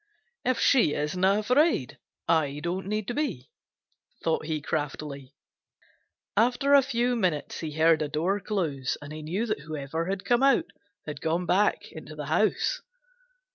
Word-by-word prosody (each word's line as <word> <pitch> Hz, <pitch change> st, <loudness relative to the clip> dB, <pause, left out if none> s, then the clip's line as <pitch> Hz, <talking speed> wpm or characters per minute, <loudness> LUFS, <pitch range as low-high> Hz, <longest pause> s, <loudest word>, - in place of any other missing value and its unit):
"If 255 Hz, -1 st, +1 dB
she 240 Hz, -, +4 dB
isn't 150 Hz, +5 st, -2 dB
afraid, 215 Hz, -, +2 dB, 0.3 s
I 145 Hz, -3 st, +2 dB
don't 180 Hz, +2 st, -2 dB
need 210 Hz, 0 st, -2 dB
to -, -, -1 dB
be," 245 Hz, -, -3 dB, 0.7 s
thought 160 Hz, -1 st, 0 dB
he 155 Hz, -1 st, -1 dB
craftily. 145 Hz, -2 st, -4 dB, 1.0 s
After 245 Hz, +6 st, +3 dB
a 280 Hz, -, +8 dB
few 245 Hz, -1 st, 0 dB
minutes 180 Hz, -10 st, -1 dB
he 155 Hz, -2 st, -5 dB
heard 160 Hz, 0 st, +4 dB
a 150 Hz, -, 0 dB
door 170 Hz, +7 st, 0 dB
close 165 Hz, -10 st, -2 dB
and 145 Hz, +1 st, -9 dB
knew 160 Hz, +8 st, -3 dB
that 215 Hz, -, -2 dB
whoever 155 Hz, +1 st, -4 dB
had 195 Hz, 0 st, -3 dB
come 240 Hz, +1 st, +3 dB
out 275 Hz, 0 st, +4 dB, 0.4 s
had 150 Hz, -2 st, -6 dB
gone 165 Hz, +2 st, 0 dB
back 195 Hz, +4 st, +1 dB
into -, -, -10 dB
the -, -, -5 dB
house. -, -, +1 dB
170 Hz, 150 wpm, -27 LUFS, 150-220 Hz, 1.0 s, a